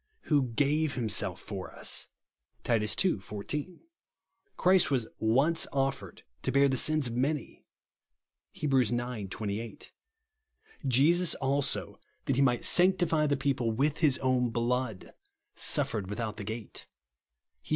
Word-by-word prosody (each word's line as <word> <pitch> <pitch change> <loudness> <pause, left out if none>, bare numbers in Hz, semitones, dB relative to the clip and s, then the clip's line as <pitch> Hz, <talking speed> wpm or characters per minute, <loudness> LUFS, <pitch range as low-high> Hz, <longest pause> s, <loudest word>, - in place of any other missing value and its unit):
"Who 145 -5 +1
gave 150 +3 +1
himself 105 -6 -1
for 95 -3 -7
us," - - -3 0.6
(Titus 105 -3 +1
ii. 180 - +2
14). 140 - -6 0.4
" 400 - -45
Christ 185 -1 +4
was 130 -5 +1
once 135 +9 +2
offered 135 -1 -2 0.2
to - - -1
bear 140 0 +5
the 135 - +1
sins 155 +2 +3
of 120 - -3
many/* 140 +4 -2 0.9
(Heb. 150 -2 -1
ix. 130 -5 +4
28). 110 -2 -4 0.5
" 440 - -14
Jesus 160 +8 +3
also, 140 0 -1 0.3
that 135 - +1
he 135 - +2
might 125 -3 +2
sanctify 175 -4 +3
the 145 -1 +1
people 135 -4 0
with 140 +7 0
his 150 -6 +3
oiun 125 -2 +2
blood, 120 -3 -2 0.4
suf - - 0
fered 100 -3 -3
without 110 +1 -4
the 105 - -6
gate," 110 +1 -7 0.7
(Heb. - - -18
130 Hz, 140 wpm, -30 LUFS, 115-150 Hz, 0.9 s, bear